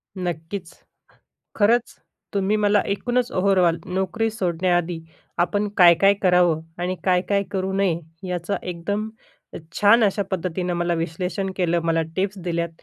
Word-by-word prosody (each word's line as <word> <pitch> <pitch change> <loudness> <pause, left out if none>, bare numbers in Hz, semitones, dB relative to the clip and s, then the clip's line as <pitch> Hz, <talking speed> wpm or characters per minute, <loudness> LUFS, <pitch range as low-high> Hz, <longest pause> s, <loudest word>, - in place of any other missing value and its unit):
नक्कीच. 175 0 -5 0.8
खरंच 230 +3 +2 0.4
तुम्ही 200 +1 +1
मला 210 -1 +3
एकूणच 245 +5 -1
ओव्हरऑल 185 -3 +2
नोकरी 190 +4 -1
सोडण्याआधी 175 -4 0 0.4
आपण 205 +4 0
काय-काय 180 +2 +6
करावं? 180 -3 +4 0.2
आणि 180 +1 -2
काय-काय 190 +2 +2
करू 190 -1 -2
नये? 190 -4 +1 0.3
याचं 180 +2 -2
एकदम 200 +5 -3 0.4
अ, - - -7 0.2
छान 220 +3 +5
अशा 200 0 +1
पद्धतीनं 180 -1 -2
मला 175 0 0
विश्लेषण 180 +4 -3
केलं, 175 -2 +1
मला 165 0 +2
टिप्स 195 +1 -1
दिल्यात, 170 -1 -1
185 Hz, 125 wpm, -23 LUFS, 175-200 Hz, 0.8 s, काय-काय